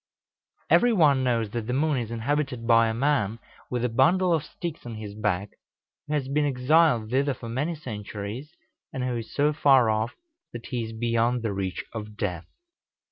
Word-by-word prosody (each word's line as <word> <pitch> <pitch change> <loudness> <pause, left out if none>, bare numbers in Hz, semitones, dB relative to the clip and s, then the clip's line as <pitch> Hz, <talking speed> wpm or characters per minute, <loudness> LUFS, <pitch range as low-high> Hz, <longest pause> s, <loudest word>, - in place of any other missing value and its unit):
] - - -68 0.3
Every 245 - +5
one 145 -9 +4
knows 115 -4 0
that 115 -1 -4
the 125 - -1
moon 145 0 +1
is 115 -2 -4
inhabited 125 +1 -2
by 115 -1 +5
a 110 - -1
man 120 -5 +1 0.3
with 125 -1 -1
a - - +3
bundle 170 +10 +3
of 160 -3 +1
sticks 165 0 -7
on 120 -2 -7
his 105 -2 -7
back, 105 -2 -1 0.6
who 150 - -1
has 140 -3 -1
been 145 +2 +1
exiled 135 -3 +3
thither 135 +1 +1
for 115 - -8
many 145 +8 -1
centuries, 110 -1 -6 0.4
and 130 - -3
who 125 -1 -1
is 115 - -7
so 145 +1 +2
far 135 -6 +5
off 110 +2 -1 0.4
that 120 -1 -7
he 120 -2 -3
is 110 - -7
beyond 115 +1 0
the 110 -3 -1
reach 95 -2 -3
of 105 -2 -7
death. 90 -5 -3
120 Hz, 190 wpm, -26 LUFS, 110-145 Hz, 0.6 s, Every